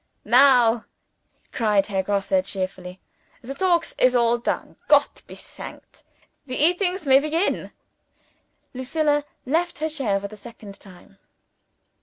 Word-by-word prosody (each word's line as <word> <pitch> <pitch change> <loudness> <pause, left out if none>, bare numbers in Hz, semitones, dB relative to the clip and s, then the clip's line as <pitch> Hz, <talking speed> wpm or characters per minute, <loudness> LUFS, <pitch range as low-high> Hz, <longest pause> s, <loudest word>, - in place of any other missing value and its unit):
"Now," 240 -2 +4 0.7
cried 210 -4 +1
Herr 195 -2 -1
Grosse 200 +6 -2
cheerfully, 185 -1 -6 0.4
"the 260 +3 -6
talkings 345 +2 0
is 255 0 +4
all 235 0 +2
done. 235 - -4
Gott - - +3
be - - -11
thanked, - - -13 0.5
the 255 - -5
eatings 360 +3 +1
may 270 -1 +6
begin!" 310 +6 -1 1.0
Lucilla 295 +3 0 0.2
left 330 +6 -1
her 315 +2 -2
chair 255 -11 -1
for 200 - -6
the 215 - -12
second 210 -2 -12
time. 195 +1 -17
250 Hz, 125 wpm, -23 LUFS, 205-300 Hz, 1.0 s, may